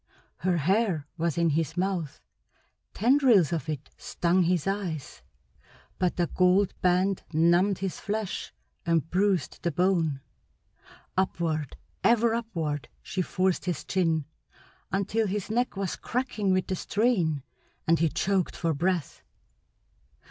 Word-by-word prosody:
Her 180 0 +1
hair 185 -1 +1
was 170 -1 -1
in 170 -1 +3
his 160 0 -1
mouth, 180 -5 -1 0.7
tendrils 235 - +4
of 160 -2 -3
it 150 -2 -5
stung 175 +1 +1
his 175 -3 +1
eyes, 185 -8 -3 0.8
but 180 -1 +1
the 175 - +1
gold 185 +3 +3
band 185 +2 +2
numbed 175 +5 +3
his 190 -2 -4
flesh 210 -2 -3 0.3
and 165 -3 +1
bruised 190 -3 +1
the 170 - 0
bone. 165 -4 +1 0.9
Upward, 165 -6 -1 0.3
ever 235 -1 +4
upward, 165 - -3
she 185 - -2
forced 185 0 0
his 175 -6 -2
chin 165 -5 +1 0.7
until 205 +3 0
his 205 +1 -3
neck 245 -2 0
was 195 -3 -2
cracking 235 -5 -1
with 185 -1 +2
the 190 - -2
strain 180 - +1 0.4
and 165 0 +3
he 165 0 +3
choked 190 +2 0
for 165 -2 0
breath. 175 +1 -1
180 Hz, 125 wpm, -27 LUFS, 165-195 Hz, 0.9 s, tendrils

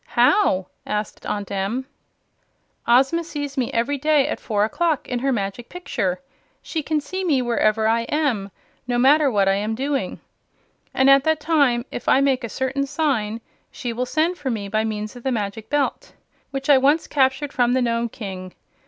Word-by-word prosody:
"How?" 300 - +4 0.2
asked 210 0 -4
Aunt 205 -1 -3
Em. 200 +7 -2 1.0
"Ozma 270 +8 +4
sees 290 -4 -5
me 255 -4 -1
every 255 +5 0
day 300 -1 +3
at - - -3
four 210 -3 0
o'clock, 320 +6 -1
in 250 -1 -2
her 270 +2 0
Magic 205 0 -3
Picture. 200 - -2 0.4
She 320 - -3
can 305 +1 0
see 370 +7 -5
me 305 -7 +2
wherever 220 -2 +2
I 230 +1 +1
am, 260 -10 0 0.4
no 245 -1 0
matter 280 +4 +5
what 200 -5 +2
I 195 - +4
am 210 +3 -1
doing. 275 +3 -2 0.7
And 265 - +2
at 275 0 +7
that 315 -1 +2
time, 285 -7 +2
if - - -3
I - - +5
make 270 -2 +2
a 235 - -4
certain 265 +4 -2
secret 320 +3 -3
sign, 225 -6 0 0.3
she 240 -2 -5
will 250 +2 -2
send 325 +6 0
for 285 -2 -3
me 215 -4 -3
by 215 +2 0
means 215 0 -4
of 245 - -10
the 265 - -1
Magic 215 -1 -3
Belt, 290 -1 -1 0.4
which 275 0 -5
I 285 -3 +6
once 290 +5 +3
captured 270 0 +1
from 245 -1 +2
the 260 - +2
Nome 235 0 0
King. 190 -5 -8
255 Hz, 190 wpm, -22 LUFS, 220-285 Hz, 1.0 s, at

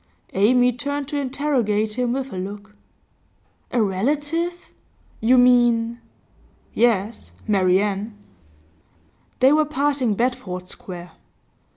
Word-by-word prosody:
Amy 245 +5 +4
turned 285 +3 -3
to 295 - -5
interrogate 255 -6 0
him 245 +1 -1
with 265 -2 -4
a - - -5
look. 205 +3 -7 0.9
'A 245 - 0
relative? 295 - -2 0.5
You 245 +4 +4
mean 240 -2 +3 0.3
?' - - -34
'Yes; 215 - 0 0.2
Marian.' 200 +2 +1 1.3
They 265 +3 +6
were 310 0 +4
passing 280 -6 0
Bedford 235 -7 -2
Square. 175 -2 -9
240 Hz, 100 wpm, -22 LUFS, 205-270 Hz, 1.3 s, They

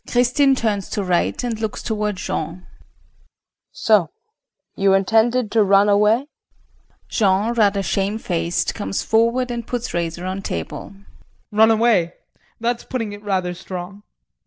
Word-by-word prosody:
KRISTIN 250 +3 +3
[Turns 210 -5 -1
to 205 - -2
R. 180 - -4
and 225 +6 0
looks 220 -1 -3
toward 210 -2 -1
Jean]. 170 0 -4 1.1
So 205 -8 +2 0.7
you 195 0 +3
intended 225 +3 +2
to 225 -2 +4
run 200 +1 +4
away? 210 +5 +3 0.8
JEAN 205 +2 +1
[Rather 205 -4 +2
shamefaced 195 -3 -1
comes 205 -2 -3
forward 235 +3 +1
and 235 -1 -5
puts 245 -1 -4
razor 170 +1 -3
on 190 +1 -3
table]. 85 - -6 0.6
Run 220 +1 +5
away? 220 -7 +2 0.4
That's 235 +1 -1
putting 225 -5 -4
it 205 - -10
rather 190 -3 -1
strong. 180 +2 -8
210 Hz, 130 wpm, -21 LUFS, 190-230 Hz, 1.1 s, Run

